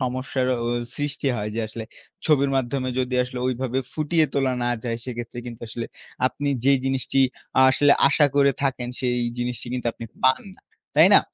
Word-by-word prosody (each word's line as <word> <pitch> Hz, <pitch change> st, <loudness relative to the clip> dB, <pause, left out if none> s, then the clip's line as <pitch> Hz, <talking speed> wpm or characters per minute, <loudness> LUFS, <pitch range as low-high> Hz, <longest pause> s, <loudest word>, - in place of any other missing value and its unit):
সমস্যার 130 Hz, +1 st, -1 dB, 0.2 s
অ -, -, 0 dB, 0.3 s
সৃষ্টি 145 Hz, -1 st, -3 dB
হয় 105 Hz, 0 st, -3 dB
যে, 115 Hz, -, -1 dB
আসলে 110 Hz, +1 st, -6 dB, 0.4 s
ছবির 140 Hz, -3 st, +3 dB
মাধ্যমে 130 Hz, 0 st, -1 dB
যদি 130 Hz, 0 st, -1 dB
আসলে 125 Hz, 0 st, -7 dB
ওইভাবে 130 Hz, 0 st, -1 dB
ফুটিয়ে 155 Hz, +1 st, +2 dB
তোলা 135 Hz, -2 st, +2 dB
না 120 Hz, -, +1 dB, 0.2 s
যায়, 115 Hz, -1 st, -1 dB
সেক্ষেত্রে 120 Hz, -1 st, -6 dB
কিন্তু 120 Hz, -1 st, -8 dB
আসলে 115 Hz, +1 st, -5 dB, 0.4 s
আপনি 145 Hz, +2 st, -2 dB, 0.2 s
যে 140 Hz, -, +6 dB
জিনিসটি 135 Hz, 0 st, 0 dB, 0.4 s
আ -, -, +7 dB
আসলে 145 Hz, +2 st, +5 dB, 0.2 s
আশা 145 Hz, +1 st, +4 dB
করে 140 Hz, -1 st, +5 dB
থাকেন, 125 Hz, -3 st, -1 dB
সেই 125 Hz, -2 st, +1 dB, 0.2 s
জিনিসটি 120 Hz, 0 st, -3 dB
কিন্তু 125 Hz, -1 st, -3 dB
আপনি 115 Hz, -, -9 dB, 0.2 s
পান 130 Hz, 0 st, +4 dB
না। -, -, -25 dB, 0.3 s
তাই -, -, +7 dB
না? -, -, +9 dB
130 Hz, 180 wpm, -24 LUFS, 120-140 Hz, 0.4 s, না